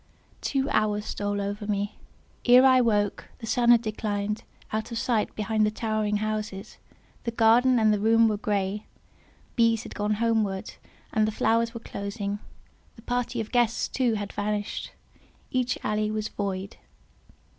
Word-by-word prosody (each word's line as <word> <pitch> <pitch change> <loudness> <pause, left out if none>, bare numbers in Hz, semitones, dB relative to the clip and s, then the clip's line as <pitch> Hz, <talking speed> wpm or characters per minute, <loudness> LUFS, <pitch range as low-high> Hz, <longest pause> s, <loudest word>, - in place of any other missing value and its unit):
Two 270 -1 0
hours 210 -1 +1
stole 205 0 -2
over 205 +1 -3
me. 205 0 -2 0.5
Ere 250 +2 +8
I 260 -1 +6
woke, 205 -4 +1
the 230 - -8
sun 240 +1 +2
had 235 -1 +7
declined 210 -1 -2 0.3
out 220 +2 -2
of 230 - -3
sight 230 -2 0
behind 215 +1 +1
the 210 - +4
towering 215 -1 -1
houses, 215 -1 -4 0.4
the - - -1
garden 235 +3 +4
and 215 -2 +4
the 210 - 0
room 225 +2 +5
were 215 - +1
grey, 205 0 -2 0.7
bees 230 -2 +3
had - - -9
gone 210 0 0
homeward, 215 -4 0 0.4
and 215 -1 +3
the - - 0
flowers 230 +2 +1
were - - -4
closing; 200 -1 -4 0.6
the 225 - -15
party 245 0 -1
of 220 - -4
guests, 240 -2 +2
too, 245 -4 +1
had 205 -1 -4
vanished; 205 0 -2 0.6
each 255 -1 0
alley 210 0 0
was 215 0 -2
void. 195 -1 -4
215 Hz, 155 wpm, -26 LUFS, 205-230 Hz, 0.7 s, Ere